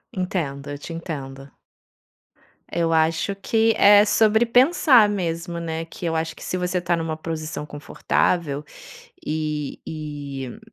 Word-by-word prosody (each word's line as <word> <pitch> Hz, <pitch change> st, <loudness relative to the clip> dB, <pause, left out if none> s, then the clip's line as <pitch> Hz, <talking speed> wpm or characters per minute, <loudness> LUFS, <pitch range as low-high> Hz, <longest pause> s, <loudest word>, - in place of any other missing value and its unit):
Entendo, 155 Hz, -7 st, -3 dB
eu 145 Hz, -, -5 dB
te 155 Hz, +4 st, -8 dB
entendo. 140 Hz, -5 st, -7 dB, 1.2 s
Eu 165 Hz, -1 st, 0 dB
acho 165 Hz, +5 st, +1 dB
que 225 Hz, +3 st, +2 dB
é 205 Hz, +1 st, +7 dB
sobre 220 Hz, +1 st, +3 dB
pensar 250 Hz, -2 st, +5 dB
mesmo, 170 Hz, -3 st, -3 dB
né? 165 Hz, -1 st, -4 dB
Que 170 Hz, -, -9 dB
eu 165 Hz, -1 st, -1 dB
acho 160 Hz, 0 st, -2 dB
que -, -, -12 dB
se 185 Hz, -, -3 dB
você 180 Hz, 0 st, -1 dB
tá 175 Hz, 0 st, 0 dB
numa 165 Hz, -1 st, -3 dB
posição 155 Hz, -2 st, -5 dB
confortável, 150 Hz, +1 st, -1 dB, 0.6 s
e 150 Hz, -2 st, -3 dB
e, 145 Hz, -, -6 dB
165 Hz, 135 wpm, -23 LUFS, 150-185 Hz, 1.2 s, é